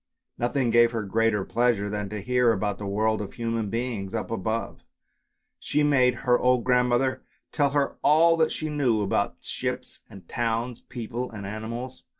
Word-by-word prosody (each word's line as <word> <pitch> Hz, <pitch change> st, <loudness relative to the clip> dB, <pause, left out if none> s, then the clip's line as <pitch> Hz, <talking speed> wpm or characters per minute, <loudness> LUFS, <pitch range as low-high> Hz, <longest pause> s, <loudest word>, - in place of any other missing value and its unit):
Nothing 120 Hz, 0 st, +1 dB
gave 120 Hz, 0 st, +5 dB
her 115 Hz, -2 st, -2 dB
greater 105 Hz, -1 st, +1 dB
pleasure 120 Hz, -4 st, +1 dB
than 105 Hz, -1 st, -3 dB
to 105 Hz, 0 st, -5 dB
hear 125 Hz, 0 st, +3 dB
about 105 Hz, -1 st, -1 dB
the 100 Hz, -, -5 dB
world 110 Hz, +2 st, +1 dB
of 100 Hz, -, -7 dB
human 115 Hz, -3 st, -2 dB
beings 115 Hz, -3 st, -3 dB
up 110 Hz, -, -3 dB
above; 110 Hz, +1 st, -3 dB, 0.8 s
she 150 Hz, -, 0 dB
made 130 Hz, -4 st, +4 dB
her 125 Hz, -1 st, +4 dB
old 125 Hz, -1 st, +3 dB
grand 125 Hz, -1 st, +3 dB
mother 130 Hz, +1 st, +1 dB, 0.3 s
tell 145 Hz, -2 st, +2 dB
her 140 Hz, 0 st, 0 dB
all 165 Hz, +2 st, +5 dB
that 160 Hz, -1 st, +2 dB
she 155 Hz, -, -2 dB
knew 130 Hz, -8 st, +1 dB
about 100 Hz, 0 st, 0 dB
ships -, -, -4 dB
and 95 Hz, -4 st, -13 dB
towns, 120 Hz, +1 st, -2 dB
people 120 Hz, +1 st, -5 dB
and 105 Hz, -3 st, -8 dB
animals. 115 Hz, +5 st, -6 dB
115 Hz, 170 wpm, -26 LUFS, 105-125 Hz, 0.8 s, gave